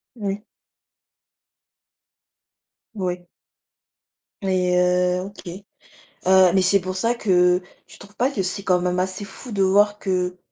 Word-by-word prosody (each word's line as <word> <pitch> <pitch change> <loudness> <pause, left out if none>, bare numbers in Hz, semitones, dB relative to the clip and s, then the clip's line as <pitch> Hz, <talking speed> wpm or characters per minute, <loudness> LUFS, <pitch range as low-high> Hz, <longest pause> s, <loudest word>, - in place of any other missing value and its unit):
Oui. 205 -2 -4 2.5
Oui. 180 -3 -4 1.1
Et 185 -2 0
heu, 180 0 +2
OK, 200 -2 -12 0.8
heu, 190 -1 +6
mais 190 - +4
c'est 195 +1 +4
pour 185 +1 -5
ça 230 +5 +1
que 180 -4 +2 0.2
tu - - -15
trouves 200 +1 -15
pas 255 +3 +1
que 200 -8 -2
c'est 190 +2 -3
quand 180 -2 +2
même 180 0 -1
assez 190 +2 -2
fou, 200 +6 -9
de 195 -1 0
voir 205 +2 +3
que, 180 -1 -2
190 Hz, 130 wpm, -22 LUFS, 180-200 Hz, 2.5 s, heu